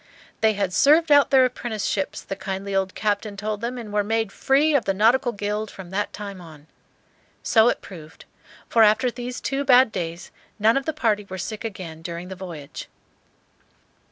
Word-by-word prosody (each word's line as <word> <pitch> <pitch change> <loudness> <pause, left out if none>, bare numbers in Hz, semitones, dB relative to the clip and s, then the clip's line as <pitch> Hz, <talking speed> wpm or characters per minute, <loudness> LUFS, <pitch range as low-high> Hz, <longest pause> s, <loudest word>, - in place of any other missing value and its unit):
"They 220 -1 +3
had 200 -3 -2
served 305 - +4
out 285 -1 +6
their 265 -2 +6
apprenticeships," 220 -5 -3
the 195 - -5
kindly 195 0 -5
old 190 -1 -1
captain 205 -1 -2
told 210 +1 -3
them, 240 +2 -3
"and 220 -4 -8
were 210 0 +2
made 225 0 -1
free 285 +7 +2
of 280 -5 +2
the 195 - 0
nautical 240 +5 +3
guild 210 0 -3
from 185 -2 -11
that 205 +2 -2
time 200 -3 -8
on." 155 -3 -14 0.8
So 225 +1 +5
it - - -2
proved; 160 -4 -12 0.4
for 230 - +3
after 220 +4 +4
these 245 +1 -6
two 275 +1 -2
bad 255 -3 +5
days 170 -2 -5 0.3
none 220 +2 +3
of 275 -1 -1
the - - +2
party 215 -8 0
were 190 - -6
sick 215 +4 -5
again 180 -7 -7
during 170 +2 -6
the 190 - -6
voyage. 170 -6 -9
210 Hz, 185 wpm, -23 LUFS, 190-240 Hz, 0.8 s, out